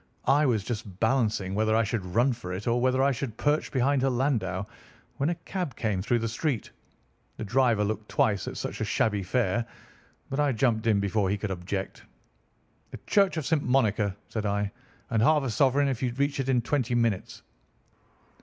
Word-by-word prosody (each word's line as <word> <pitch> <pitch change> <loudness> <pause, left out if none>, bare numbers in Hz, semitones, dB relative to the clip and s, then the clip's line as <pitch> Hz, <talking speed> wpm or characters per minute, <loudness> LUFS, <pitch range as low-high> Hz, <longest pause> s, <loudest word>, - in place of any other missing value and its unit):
I 145 +2 +4
was 110 -6 +1
just 100 -4 -6
balancing 110 -5 +1
whether 110 +1 +2
I 115 - +4
should 110 -1 -2
run 120 +9 +2
for 115 -6 -7
it, 95 +3 -5
or 120 +1 +1
whether 130 +1 +2
I 140 - +4
should 120 -3 -4
perch 150 +1 0
behind 135 +1 +2
her 135 - +2
landau 115 -8 0 0.5
when 140 +3 +1
a 175 - 0
cab 180 -7 -5
came 105 -5 -1
through 120 +5 +1
the 115 0 -1
street. 120 +1 -2 0.7
The - - -4
driver 115 -1 +2
looked 105 0 -3
twice 100 -3 +1
at - - -5
such - - -5
a - - +2
shabby 105 -3 +1
fare, 115 +3 0 0.7
but 135 - -2
I 145 -2 +2
jumped 115 -1 +1
in 105 -3 +4
before 100 0 0
he 100 - 0
could 105 -1 -4
object. 95 +2 -4 0.9
'The - - -8
Church 195 -4 +3
of 155 - -2
St. 160 -1 +2
Monica,' 110 -7 +1
said 110 - -4
I, 100 0 -1 0.4
'and 110 - +2
half 150 +4 +4
a 130 - -2
sovereign 140 +3 +3
if 130 -4 -2
you 125 -2 0
reach 140 +2 -1
it 135 0 -1
in 125 -3 +2
twenty 125 -2 0
minutes. 115 -5 -1
115 Hz, 195 wpm, -27 LUFS, 105-135 Hz, 0.9 s, I